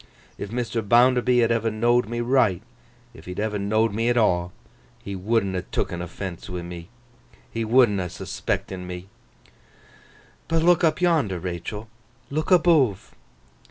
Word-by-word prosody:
If 100 - -5
Mr. 115 0 -2
Bounderby 125 +3 +4
had 115 - +2
ever 115 -1 +1
know'd 120 +1 +1
me 120 0 -2
right—if 120 +1 -2
he'd 90 +1 -6
ever 105 -1 -1
know'd 110 +2 +1
me 115 +3 0
at 120 - +1
aw—he 90 0 -2
would'n 100 +1 0
ha' 90 -1 -2
took'n 85 -1 -2
offence 90 +1 -7
wi' 90 -1 -5
me. 85 0 -8 0.6
He 115 - -2
would'n 115 -3 +4
ha' 90 -1 -3
suspect'n 90 +1 -4
me. 90 +1 -7 1.4
But 165 0 +1
look 175 0 +4
up 160 +1 +2
yonder, 155 - +2
Rachael! 90 +5 -5 0.4
Look 155 +2 -2
aboove! 160 - +3
110 Hz, 140 wpm, -24 LUFS, 95-120 Hz, 1.4 s, Bounderby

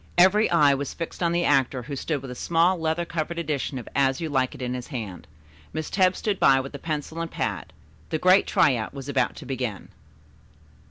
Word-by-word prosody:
Every 190 +5 +5
eye 150 -5 +5
was 140 0 -3
fixed 165 +1 -6
on 170 -1 +2
the 175 0 +1
actor, 135 -2 +2
who 140 +3 -6
stood 140 0 -3
with 130 - -7
a - - -4
small 170 +6 +2
leather 160 +1 -1
covered 170 0 -3
edition 150 -4 -2
of 120 - -7
"As 135 -1 +2
You 165 - -3
Like 130 -3 0
It" - - -10
in 125 0 -2
his 125 -1 -5
hand. 105 - -6 0.5
Miss 155 -1 -4
Tebbs 185 -1 +3
stood 205 -3 -1
by 135 -1 +5
with 135 +2 -6
a 140 - -7
pencil 160 +1 -4
and 165 - -3
pad. - - -3 0.4
The 160 - 0
great 185 +5 +4
try 140 -3 +4
out 115 +4 -5
was 135 -1 -7
about 130 -4 0
to - - -10
begin. 125 -7 -4
145 Hz, 220 wpm, -25 LUFS, 130-170 Hz, 0.5 s, Every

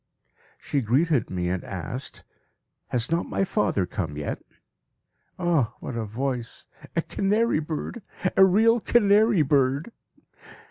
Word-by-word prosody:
She 140 - -1
greeted 135 +3 +1
me 90 -1 -2
and 90 0 -2
asked, 100 +8 -6 0.6
"Has 125 +3 -2
not 170 +1 0
my - - 0
father 185 - 0
come 80 -7 -4
yet?" 75 - -4 1.0
Ah! 165 -10 +1
what 125 - -6
a 115 -1 -2
voice. 120 +2 -4 0.3
A 165 - +1
canary 210 -1 +1
bird! 160 +9 -5 0.3
A 195 - +7
real 220 +5 +5
canary 210 -4 +4
bird! 140 - +1
145 Hz, 125 wpm, -25 LUFS, 115-195 Hz, 1.0 s, A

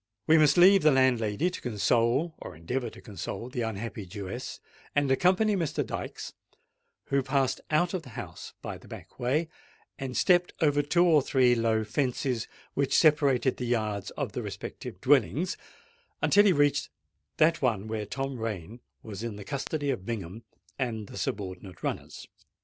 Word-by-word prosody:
We 160 0 +6
must 150 +1 +5
leave 190 +2 +7
the 155 - +6
landlady 130 - +2
to - - -7
console—or 120 - 0
endeavour 120 +10 -3
to - - -14
console 105 +2 -6
the 125 -1 -3
unhappy 110 -2 -4
Jewess,—and 120 +7 -4
accompany 190 +9 +3
Mr. 165 -5 -1
Dykes, - - -6 0.8
who 140 0 +2
passed 135 0 0
out 170 +4 +2
of 185 - -1
the 135 - -13
house - - -8
by - - -5
the - - -17
back - - -11
way, 140 +7 +1 0.5
and 130 -2 -4
stepped 175 -1 +3
over 145 -3 +3
two 170 +5 +3
or 160 -4 +5
three 130 -2 +3
low 115 -2 +1
fences 125 0 -1 0.3
which 140 -1 +1
separated 140 -5 +3
the 125 - -3
yards 110 -4 -1
of - - -2
the - - -4
respective 90 - -7
dwellings, 145 - +2 0.6
until 205 +1 +5
he 200 - +6
reached 145 -3 +2 0.5
that 165 +2 +3
one 110 -6 0
where 110 -2 -3
Tom 135 +1 -4
Rain 110 0 -5 0.2
was 105 -2 -7
in 115 -2 -4
the 105 - -8
custody 140 +2 -2
of 120 -8 -4
Bingham 105 -1 -5 0.4
and 110 -6 -3
the - - -9
subordinate 95 -1 -5
runners. - - -4
130 Hz, 160 wpm, -28 LUFS, 110-150 Hz, 0.8 s, leave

